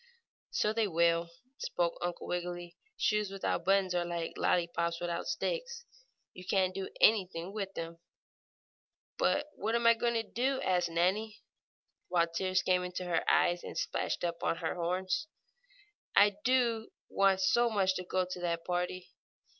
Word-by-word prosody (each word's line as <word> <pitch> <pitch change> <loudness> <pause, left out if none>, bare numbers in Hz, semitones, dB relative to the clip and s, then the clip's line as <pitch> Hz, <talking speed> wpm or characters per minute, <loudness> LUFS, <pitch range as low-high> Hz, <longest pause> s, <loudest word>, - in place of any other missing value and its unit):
"So 210 - +1
they 220 -1 +1
will," 170 -1 +2 0.3
spoke 170 -1 -1
Uncle 175 0 -3
Wiggily. 175 0 -4 0.2
"Shoes 210 -2 +1
without 195 -3 -2
buttons 195 -1 +3
are 175 -1 +1
like 170 -1 -3
lollypops 170 -1 0
without 175 -1 -3
sticks, 480 +8 -3 0.5
you 185 - -10
can't 185 0 +1
do 195 0 -4
anything 190 -4 +3
with 195 -2 -4
them." 165 0 -6 1.2
"But - - +2
what 220 +3 -2
am 235 0 0
I 230 - +8
going 235 +1 0
to 225 - +1
do?" 260 +5 -1
asked 180 -2 +1
Nannie, 195 +6 0 0.6
while 175 -1 +3
tears 185 +2 0
came 180 0 +2
into 180 0 -4
her 170 -2 0
eyes 175 0 +3
and - - -7
splashed - - -2
up 170 -1 -2
on 165 - 0
her 165 -2 -2
horns. 185 - -1 0.9
"I 205 0 +6
do 235 -3 +2 0.2
want 195 -1 +3
so 240 +5 +4
much 195 -4 +2
to 185 - -4
go 185 +1 0
to 180 0 -6
that 170 -1 -2
party." 180 0 -2
185 Hz, 155 wpm, -32 LUFS, 175-210 Hz, 1.2 s, I